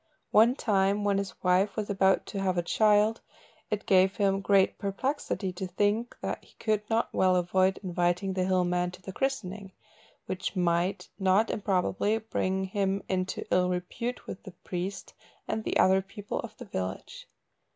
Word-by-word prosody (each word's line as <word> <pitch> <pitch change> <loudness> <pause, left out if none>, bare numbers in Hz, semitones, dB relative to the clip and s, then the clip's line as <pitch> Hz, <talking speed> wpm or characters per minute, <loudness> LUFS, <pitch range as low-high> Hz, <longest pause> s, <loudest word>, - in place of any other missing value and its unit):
One 230 +4 +6
time 200 -3 +1
when 200 -1 +2
his 200 -1 -5
wife 185 +2 +3
was 215 -2 -2
about 195 -1 +2
to 195 - -4
have 185 -2 0
a 175 - +1
child, 210 +3 +3 0.5
it 210 -1 -2
gave 190 0 +4
him 195 -1 +1
great 195 -1 +3
perplexity 200 -2 -2
to 185 +1 -4
think 205 +6 0
that - - -3
he - - -22
could 215 -2 0
not 225 0 0
well 185 -1 +3
avoid 185 +2 +2
inviting 180 +1 0
the 185 -1 0
hill 185 -1 +2
man 180 0 0
to 180 - -12
the 190 - -7
christening, 205 -8 -3 0.5
which 185 +2 -4
might, 175 +2 0
not 195 +3 +3
improbably, 200 +1 0
bring 190 -3 -1
him 195 0 -1
into 185 0 -2
ill 180 0 +3
repute 180 +7 -4
with 190 - -7
the 190 - -11
priest 185 +1 -5 0.3
and 220 - -2
the - - 0
other 190 +1 +5
people 200 +1 -6
of 220 -2 -7
the 245 - -9
village. 95 - -5
195 Hz, 170 wpm, -28 LUFS, 185-210 Hz, 0.5 s, One